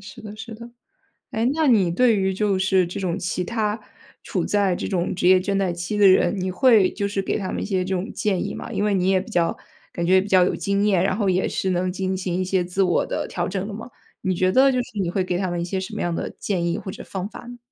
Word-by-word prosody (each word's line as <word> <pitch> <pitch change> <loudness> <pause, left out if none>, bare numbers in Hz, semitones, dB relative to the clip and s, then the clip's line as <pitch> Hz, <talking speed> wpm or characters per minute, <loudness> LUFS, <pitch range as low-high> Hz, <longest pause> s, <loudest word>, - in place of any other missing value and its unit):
是 195 +1 -12
的， 210 -1 -8
是 225 +1 -8
的。 235 +2 -11 0.6
哎， 225 +1 -1
那 315 +1 +1
你 215 -10 +4
对 230 +4 +3
于 190 -1 +1
就 195 -1 0
是 190 -1 +3
这 175 - -6
种 185 -2 -1
其 180 -1 -2
他 220 0 -1 0.4
处 - - -2
在 200 -3 +1
这 - - -4
种 180 -2 -1
职 180 0 +2
业 185 0 +7
倦 195 +2 -2
怠 195 -2 +1
期 175 +5 -4
的 205 - +5
人， 190 +1 +4
你 185 0 -2
会 210 -1 +4
就 200 - -2
是 200 -1 -2
给 - - -1
他 190 - -4
们 - - -3
一 - - -3
些 190 -3 -1
这 190 0 -1
种 185 +5 -3
建 205 -4 -1
议 - - -4
吗？ - - -7
因 205 - -1
为 210 - +1
你 185 -1 +1
也 190 -1 +3
比 210 - -11
较 170 -4 +1 0.4
感 170 - -2
觉 185 +2 +5
比 190 - -3
较 185 -3 +5
有 180 - +1
经 200 +1 0
验， 195 -4 +3
然 190 0 +1
后 205 -2 0
也 185 0 +1
是 190 - -2
能 185 0 0
进 190 +1 -2
行 185 -2 -3
一 185 - 0
些 185 -1 0
自 185 +2 0
我 180 - +2
的 - - -3
调 175 -1 -2
整 190 0 -3
的 205 - -6
嘛。 225 +3 -8 0.3
你 185 -1 0
觉 185 +1 +2
得 265 +6 +5
就 - - 0
是 210 - -8
你 175 -3 0
会 185 +1 0
给 180 -1 -2
他 185 -1 -1
们 175 -1 -2
一 - - -1
些 190 +2 -2
什 185 - -6
么 - - -3
样 175 - -1
的 - - -3
建 180 -4 -1
议 170 - -1
或 190 - -6
者 - - -9
方 190 +1 -5
法 - - -10
呢？ 245 - -9
190 Hz, 310 characters per minute, -23 LUFS, 180-205 Hz, 0.6 s, 业